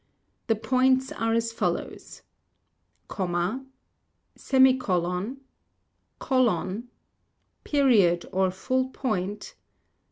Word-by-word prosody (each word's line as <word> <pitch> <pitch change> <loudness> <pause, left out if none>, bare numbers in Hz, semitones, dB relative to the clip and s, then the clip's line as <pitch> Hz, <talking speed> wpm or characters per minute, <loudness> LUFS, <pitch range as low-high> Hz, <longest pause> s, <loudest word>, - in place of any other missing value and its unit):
The 225 - +2
Points 260 +4 +2
are 225 0 -1
as 230 0 0
follows: - - -4 0.8
Comma, 180 +6 -2 0.7
Semicolon; 250 -4 +1 0.8
Colon: 235 - 0 0.7
Period, 215 - +3
or 190 0 +2
Full 255 +8 -1
Point 210 - -3
225 Hz, 70 wpm, -26 LUFS, 185-260 Hz, 0.8 s, Period